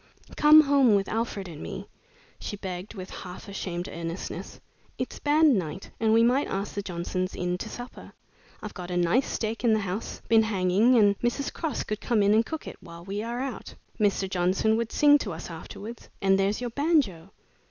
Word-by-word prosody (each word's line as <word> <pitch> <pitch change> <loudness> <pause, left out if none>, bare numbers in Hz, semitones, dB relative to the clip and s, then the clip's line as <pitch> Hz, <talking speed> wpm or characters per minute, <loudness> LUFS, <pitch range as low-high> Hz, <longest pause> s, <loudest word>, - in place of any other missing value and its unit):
"Come 305 +1 +8
home 275 -6 +4
with 195 -1 +1
Alfred 220 -4 -2
and 160 -3 -9
me," - - -6 0.5
she 205 - -5
begged, 185 +1 -6
with 185 -1 -8
half 180 +3 -9
ashamed 180 -3 -4
earnestness. 170 +1 -6 0.4
"It's - - -4
band 295 -5 +4
night 165 +2 -6
and 220 -1 +2
we 225 +1 +5
might 255 +4 +3
ask 195 +2 -3
the 200 - -2
Johnsons 185 0 -3
in 180 0 -1
to 220 - -5
supper. 245 +3 -9 0.5
I've 215 - -6
got 180 -2 -7
a 180 - -1
nice 175 +10 +2
steak 225 +1 -3
in 230 -2 +4
the 215 - +3
house, 195 +3 -4
been 225 0 +6
hanging, 210 +3 +3
and 205 -2 +4
Mrs. 245 +4 -1
Cross 320 -6 -2
could 215 0 -4
come 225 -4 +2
in 200 +1 +4
and 220 +1 +4
cook 320 +6 -6
it - - -8
while 170 -1 -12
we 200 +2 -3
are 235 +2 -3
out. 265 -4 -6 0.2
Mr. 200 -2 +2
Johnson 185 +4 +1
would 230 0 -2
sing 290 0 +5
to - - -4
us 165 +2 -7
afterwards, 205 +7 -9
and 195 0 +3
there's 200 +4 +1
your 245 -1 -3
banjo. 255 - +1
205 Hz, 195 wpm, -27 LUFS, 185-235 Hz, 0.5 s, Come